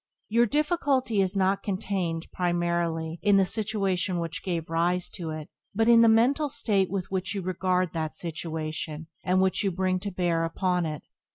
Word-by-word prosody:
Your 235 +2 +4
difficulty 280 - +1
is 190 0 0
not 195 0 +2
contained, 185 -5 -2
primarily, 170 -2 -1
in 205 -1 +4
the 195 - +4
situation 195 -3 -1
which 170 -1 -4
gave 170 -4 -2
rise 170 +2 0
to 170 -4 -5
it, 155 -1 -5 0.3
but 225 +2 +2
in 235 -1 +7
the 230 - +7
mental 265 +7 +3
state 200 -7 +1
with 190 -1 -3
which 190 +1 -2
you 195 - -3
regard 185 -1 0
that 160 -2 -3
situation 160 -1 -4 0.2
and 185 +1 +2
which 190 +2 +1
you 200 - +2
bring 185 0 0
to 200 +2 -4
bear 175 -3 0
upon 180 +1 0
it. 155 -1 -5
185 Hz, 175 wpm, -27 LUFS, 170-200 Hz, 0.3 s, in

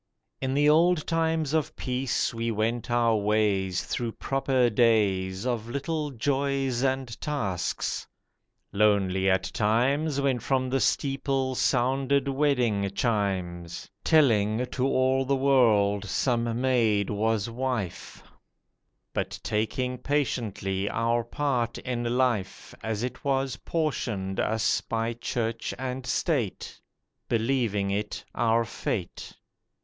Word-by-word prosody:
IN 130 0 -1
the 145 +1 +4
old 165 +1 +4
times 160 -2 0
of 160 -3 0
peace 130 0 -1
we 115 0 -2
went 115 +2 -1
our 120 -1 +3
ways, 100 -3 +1
Through 115 -2 -3
proper 135 -2 +1
days 105 -4 +2
Of 120 -3 -2
little 150 +3 -2
joys 135 0 0
and 130 -3 -1
tasks. 100 - -2 0.7
Lonely 95 -2 +3
at 95 0 +2
times, 135 +8 +1
When 135 -3 +1
from 130 0 0
the 135 - +2
steeple 135 +1 0
sounded 135 +3 +1
wedding 125 -8 +1
chimes, 95 -8 -2
Telling 115 -6 +3
to 130 +1 0
all 130 0 +2
the 135 +1 +1
world 110 -7 +3
some 115 +1 0
maid 115 -6 +2
was 110 0 0
wife— 120 -6 -4 0.9
But - - -3
taking 125 +4 -1
patiently 110 -9 -1
our 115 +1 +1
part 120 -2 -1
in 120 -1 -2
life 120 -7 -1
As 110 0 -2
it 125 0 -5
was 135 -3 0
portioned 115 - -2
us 110 0 +1
by 115 0 -2
Church 115 -1 -3
and 130 0 -4
State, 125 - -1 0.5
Believing 115 -4 0
it 105 +1 -3
our 115 0 +2
fate. 95 -5 -4
120 Hz, 115 wpm, -27 LUFS, 105-135 Hz, 0.9 s, the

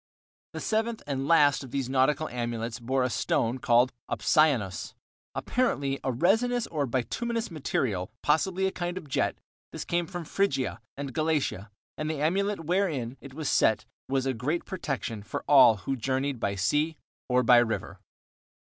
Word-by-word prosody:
The - - -5
seventh 225 +1 -1
and 135 -1 -2
last 145 -4 +4
of 130 - -9
these 135 0 -2
nautical 135 +4 +2
amulets 120 -1 -3
bore 130 +2 0
a 125 - +1
stone 115 +2 0
called 120 +2 +3 0.2
opsianos, 135 - +1 0.4
apparently 140 - 0
a 130 - 0
resinous 225 - +2
or 145 -4 -2
bituminous 230 - -2
material, 115 - -1
possibly 180 +5 +2
a 190 - +1
kind 175 -1 -4
of 175 -5 -7
jet; 135 - 0 0.3
this - - -6
came 170 0 0
from 175 -3 -6
Phrygia 150 - 0 0.2
and 140 -2 -5
Galatia, 150 -10 -1 0.3
and 155 0 -2
the 155 -2 -2
amulet 195 +6 0
wherein 155 -9 0
it 140 -1 -11
was 155 -2 -4
set 110 - +3 0.2
was 135 -1 +1
a 135 - +1
great 145 +9 -2
protection 135 - -4
for 105 - -5
all 130 -5 +8
who 105 +8 -3
journeyed 130 +1 -1
by 100 -2 -1
sea 150 - +1 0.3
or 125 0 +3
by 120 +1 +7
river. 120 -2 0
140 Hz, 160 wpm, -28 LUFS, 125-170 Hz, 0.4 s, all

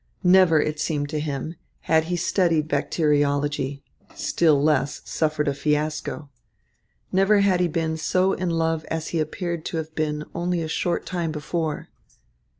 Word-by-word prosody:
Never, 180 -3 +6
it 150 0 -1
seemed 145 -2 -1
to 155 0 -2
him, 150 +1 -3 0.3
had 160 0 +2
he 175 +2 -1
studied 165 -3 +1
bacteriology, 145 -1 0 0.3
still 155 -4 +2
less, 145 -1 +1
suffered 155 -1 0
a 140 - +2
fiasco. 150 +1 -2 0.8
Never 195 +2 +4
had 190 -3 +3
he 180 - +3
been 160 -1 -1
so 185 +4 +2
in 185 -1 -2
love 165 -1 0
as 160 -1 -3
he 165 - -1
appeared 170 +1 -3
to 165 - -3
have 160 0 -5
been 150 -1 -1
only 175 0 -1
a - - -3
short 170 +2 -1
time 175 -3 -2
before. 155 0 -3
160 Hz, 150 wpm, -24 LUFS, 150-170 Hz, 0.8 s, Never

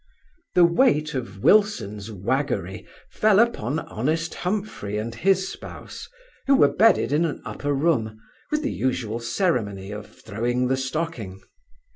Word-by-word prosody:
The 175 - +7
weight 170 - +2
of 120 -7 -5
Wilson's 115 - +2
waggery 105 - -2 0.2
fell 215 -2 +3
upon 160 - +1
honest 155 - -2
Humphry 180 - -3
and 115 +2 -3
his 190 +9 +2
spouse, - - -9 0.4
who 275 - +6
were 140 - +4
bedded 220 -3 +4
in 150 +3 +3
an 160 -3 -2
upper 145 - -3
room, 135 -7 0 0.3
with 300 0 -1
the 290 - -1
usual 120 -3 -2
ceremony 115 - -1
of 105 0 -7
throwing 120 +4 -2
the 130 - +2
stocking. 130 - -4
135 Hz, 135 wpm, -24 LUFS, 110-175 Hz, 0.4 s, The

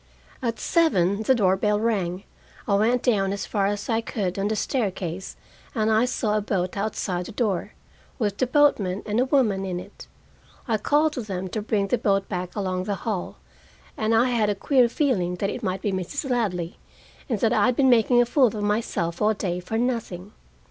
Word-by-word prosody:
At 230 -3 -2
seven 200 - +2
the 260 +4 +3
door 190 -5 +3
bell 210 +2 +1
rang. 195 -5 -1 0.4
I 200 - +1
went 230 +5 +2
down 200 -6 +2
as 200 - -3
far 200 -2 0
as 205 0 -3
I 225 -1 +1
could 200 -5 -3
on 195 - 0
the 220 - 0
staircase, 190 -6 -3 0.4
and 220 -1 +1
I 220 +2 +4
saw 220 -4 -1
a 215 - +1
boat 185 -3 -2
outside 195 -3 -2
the - - -8
door, 205 -5 -1 0.4
with 205 -5 -1
the 255 - +2
boatman 230 -9 +2
and 215 +2 0
a 255 - +3
woman 240 -9 +2
in 180 -2 -3
it. 190 +3 -12 0.6
I 225 -2 +1
called 300 +6 +2
to 255 - -3
them 190 -3 -4
to 215 - -3
bring 205 -2 0
the 245 - +1
boat 195 -1 +1
back 180 -2 -4
along 185 -3 -2
the 200 - -1
hall, 210 -6 -3 0.6
and 220 +1 +1
I 240 +3 +4
had 220 -3 +2
a 205 - 0
queer 255 +1 +3
feeling 205 - 0
that 195 +2 -2
it - - -6
might 190 -2 -3
be 205 - 0
Mrs. 225 - -3
Ladley, 180 -8 -1 0.5
and 230 -5 0
that 225 +1 +3
I'd 250 0 +3
been 270 0 +3
making 240 +1 +5
a - - -3
fool 255 +2 +4
of 225 - -4
myself 205 -5 -1
all 215 +1 +3
day 180 -3 -2
for 180 +5 -4
nothing. 225 -6 -2
210 Hz, 205 wpm, -24 LUFS, 190-235 Hz, 0.6 s, making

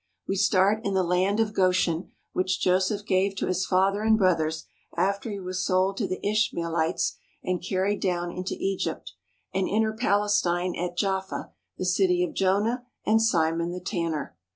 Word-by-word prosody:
We 195 - 0
start 200 +2 +3
in 200 -3 -1
the 190 - +3
Land 185 +4 +1
of 220 -2 +1
Goshen 185 -3 +1 0.2
which 185 +1 0
Joseph 190 +3 +1
gave 195 -1 +1
to - - -2
his 185 +1 -1
father 195 +2 +2
and 220 0 +4
brothers 160 -5 +1 0.3
after 200 +4 0
he 200 -2 -4
was 185 0 -3
sold 185 +1 +2
to 205 - -1
the 185 - -3
Ishmael 205 -6 0
ites 160 0 0 0.3
and 180 -1 -1
carried 190 +2 0
down 175 -2 -1
into 185 +1 -4
Egypt, 185 - -3 0.4
and 190 0 0
enter 220 +1 +1
Palestine 200 -5 +1
at 175 0 -4
Jaffa, 190 -1 -2 0.3
the 185 - -3
city 185 -1 +2
of 180 - -3
Jonah 210 +6 +1 0.2
and 220 +1 +4
Simon 170 -5 +1
the 180 - -4
Tanner. 165 - -3
185 Hz, 170 wpm, -26 LUFS, 180-200 Hz, 0.4 s, and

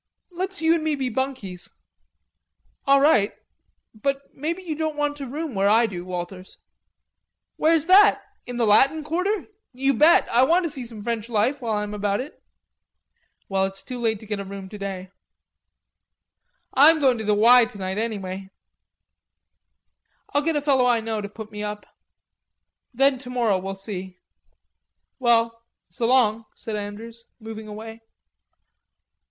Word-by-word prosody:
Let's 370 -1 -3
you 320 +1 +5
and 330 -2 0
me 310 -1 0
be 265 -2 -2
bunkies." 245 -8 -4 1.2
"All 275 0 +6
right.... 275 -8 +4 0.6
But 275 +5 -3
maybe 335 +6 -4
you 320 -4 -4
won't 315 0 -2
want 295 0 -1
to 275 -2 -6
room 300 +2 -5
where 195 0 +2
I 225 +3 +5
do, 180 -5 -5
Walters." 185 +1 -7 1.0
"Where's 320 -1 +2
that? 390 +4 +6 0.2
In 245 -1 -5
the 235 - +2
Latin 275 +9 +4
Quarter?... 365 +7 -1 0.3
You 270 +2 +1
bet. 305 +7 +5
I 240 - +4
want 335 +8 +4
to 330 - -2
see 260 -5 -4
some 220 -3 -9
French 230 0 -3
life 240 +6 0
while 230 -2 -2
I 210 - -1
am 210 0 -6
about 205 -1 -1
it." 270 +4 -8 1.1
"Well, 190 -1 +1
it's 195 0 -7
too 250 -2 -7
late 220 -3 0
to - - -11
get 210 -1 -4
a - - -4
room 195 -1 -8
to 210 - -9
day." 190 -2 -6 1.6
"I'm 305 +5 +7
going 260 -6 +2
to - - -4
the 210 0 +2
'Y' 235 +3 +7
tonight 190 -2 -5
anyway." 195 -4 -4 1.8
"I'll 290 - +3
get 325 +1 0
a 295 - -1
fellow 265 -4 +3
I 240 -2 +3
know 220 -1 -3
to 200 - -6
put 215 +1 -10
me 210 0 -7
up.... 210 0 -5 1.1
Then 270 +1 +2
tomorrow, 245 -6 0
we'll 195 +1 -5
see. 190 -2 -7 1.0
Well, 230 -2 +2 0.3
so 230 +7 -1
long," 230 -3 +3
said 220 - -5
Andrews, 220 +3 -7
moving 220 -1 -8
away. 220 +2 -9
230 Hz, 160 wpm, -24 LUFS, 205-275 Hz, 1.8 s, I'm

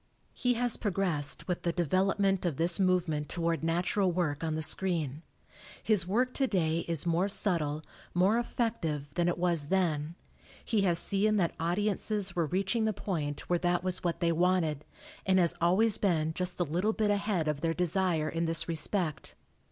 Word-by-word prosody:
He 250 -1 0
has 245 0 +1
progressed 175 -8 -1
with 180 -2 -2
the 170 - -1
development 190 +3 +1
of 170 -7 -2
this 170 +3 +3
movement 175 -6 0
toward 165 -3 -1
natural 180 +3 0
work 165 -4 -2
on 160 -1 -1
the 160 - 0
screen. 160 -5 0 0.6
His 205 -6 +3
work 250 +6 0
today 175 - 0
is 165 -2 0
more 175 +3 +1
subtle, 160 -7 0 0.3
more 195 +6 +3
effective, 165 - -3
than 175 +2 0
it 175 - 0
was 170 -4 +1
then; 165 -3 -1 0.5
he 220 -3 +1
has 175 -4 +3
seen 210 +4 +1
that 175 -4 0
audiences 200 +2 -1
were 170 -3 0
reaching 195 +6 0
the 215 - 0
point 155 -8 -4
where 175 -1 +1
that 175 0 0
was 185 -1 -2
what 170 -2 -2
they 170 -1 +2
wanted, 165 -3 +1 0.4
and 190 0 +2
has 175 -3 +3
always 195 +5 +3
been 160 -5 0
just 180 +1 -2
a - - +3
little 175 +7 -1
bit 215 -2 0
ahead 200 -5 -1
of 150 -2 -2
their 165 0 -1
desire 180 -3 +1
in 165 +2 -2
this 165 0 +1
respect. 165 -1 0
175 Hz, 175 wpm, -30 LUFS, 165-195 Hz, 0.6 s, this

